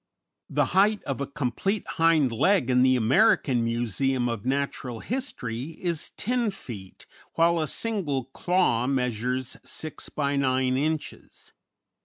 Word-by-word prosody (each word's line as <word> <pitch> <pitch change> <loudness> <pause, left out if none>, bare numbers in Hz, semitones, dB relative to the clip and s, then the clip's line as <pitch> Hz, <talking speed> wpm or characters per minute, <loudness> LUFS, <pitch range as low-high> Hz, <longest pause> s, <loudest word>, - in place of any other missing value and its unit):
The - - +2
height 205 +3 +3
of 140 0 -3
a 140 - -2
complete 145 - -2
hind 165 -5 +3
leg 135 - +2
in 125 0 +4
the 130 0 +5
American 125 - +3
Museum 120 +2 0
of 115 -1 -4
Natural 135 -3 -2
History 155 - -4
is 170 -4 -2
10 240 -1 0
feet, 110 - -9 0.3
while 170 +1 +3
a 155 - 0
single 170 - -1
claw 135 -2 +1
measures 125 -1 -1
6 155 -1 -6
by 140 -1 -1
9 130 -1 +1
inches. 155 +3 -4
135 Hz, 130 wpm, -26 LUFS, 125-165 Hz, 0.3 s, the